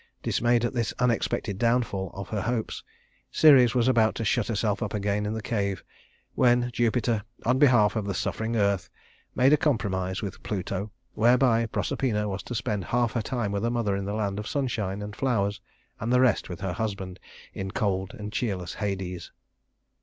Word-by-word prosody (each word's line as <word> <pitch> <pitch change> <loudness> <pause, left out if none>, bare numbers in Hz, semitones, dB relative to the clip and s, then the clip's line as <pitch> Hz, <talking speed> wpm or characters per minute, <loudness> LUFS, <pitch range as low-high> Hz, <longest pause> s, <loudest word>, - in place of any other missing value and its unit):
Dismayed 120 0 +2
at 120 - -2
this 115 -5 -1
unexpected 115 -5 0
downfall 115 -5 +1
of 100 0 -6
her 105 -2 -2
hopes, 115 +1 -2 0.5
Ceres 130 -7 +6
was 120 -1 +3
about 115 -4 +3
to 115 - -3
shut 110 +1 +1
herself 105 -2 0
up 110 -2 -2
again 105 0 -1
in 105 - -2
the 110 - -5
cave, 100 -5 -2 0.5
when 120 -1 +3
Jupiter, 115 -1 +1 0.2
in 125 +2 +2
behalf 120 -8 +5
of 110 -3 -1
the 100 - -2
suffering 110 +4 -2
earth, 100 -3 +1 0.5
made 130 +3 +5
a - - +6
compromise 100 -10 -1
with 100 -2 -6
Pluto 100 0 -3 0.2
whereby 120 0 +4
Proserpina 110 -2 -1
was 100 0 -3
to 120 - -6
spend 105 -4 -2
half 120 -1 +1
her 115 - -1
time 115 -2 -2
with 100 0 -1
her 115 - +1
mother 115 -4 0
in 100 0 -3
the 100 +1 -3
land 100 -2 -1
of 105 - -5
sunshine 105 -8 -2
and 105 0 -7
flowers, 100 -6 0 0.4
and 115 +3 -2
the 125 - +5
rest 125 -6 +2
with 90 -1 -7
her 95 -3 -2
husband 95 -2 -4 0.3
in 95 0 -4
cold 95 -1 -1
and 105 0 -7
cheerless 95 -8 -2
Hades. 95 -4 -4
110 Hz, 185 wpm, -27 LUFS, 100-120 Hz, 0.5 s, Ceres